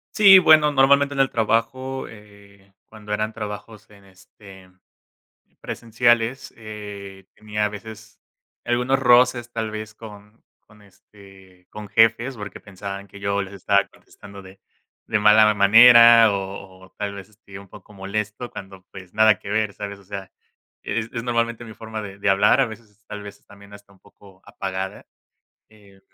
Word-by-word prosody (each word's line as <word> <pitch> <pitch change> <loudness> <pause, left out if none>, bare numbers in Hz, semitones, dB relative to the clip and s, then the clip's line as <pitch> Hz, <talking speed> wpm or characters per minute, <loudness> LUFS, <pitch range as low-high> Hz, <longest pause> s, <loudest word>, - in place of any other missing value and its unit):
Sí, 195 -3 +8
bueno, 155 -3 +5
normalmente 140 +1 +3
en 140 - -5
el 135 0 +3
trabajo, 130 +4 -2
eh, 100 -2 -18 0.2
cuando 105 -1 -8
eran 110 +1 -2
trabajos 105 0 -9
en, 100 -1 -20
este, 95 0 -18 0.9
presenciales 120 +1 -1
eh, 100 -3 -10
tenía 105 0 -4
a - - -2
veces 105 +1 -12 0.5
algunos 125 +3 0
roces 120 -1 +3
tal 110 -1 -4
vez, 110 0 -8
con 105 0 -14 0.2
con, 105 -1 -22
este, 95 -2 -20
con 105 0 -10
jefes, 115 +4 +2
porque, 105 0 -8
pensaban 100 0 -9
que 100 +1 -15
yo 100 0 -1
les 100 +1 -10
estaba 100 +1 +1
contestando 100 0 -15
de 95 +1 -16 0.5
de 110 - 0
mala 105 +1 +5
manera, 115 +2 +7
o 95 -1 -7
o - - -24
tal 100 -1 -4
vez, 95 -2 -11
este, 100 -2 -14
un 100 0 -15
poco 105 +2 -16
molesto 105 +4 -5
cuando, 95 -2 -11
pues, 95 -2 -13
nada 110 -2 +4
que - - -12
ver, 105 -1 -1
¿sabes? 100 -1 -8
O 100 - -20
sea, 95 -1 -9 0.5
es 115 -1 -4
es 115 -2 -5
normalmente 115 -1 -2
mi 110 - -12
forma 110 0 -8
de 100 -1 -10
de 100 0 0
hablar, 100 +2 +3
a - - +2
veces 110 -2 -14
tal 105 -1 -8
vez 100 0 -11
es - - -38
también 100 0 -17
hasta 100 -1 -17
un 95 - -25
poco 95 -2 -21
apagada. 95 0 -6 0.6
Eh. 100 -3 -22
105 Hz, 165 wpm, -21 LUFS, 100-115 Hz, 0.9 s, Sí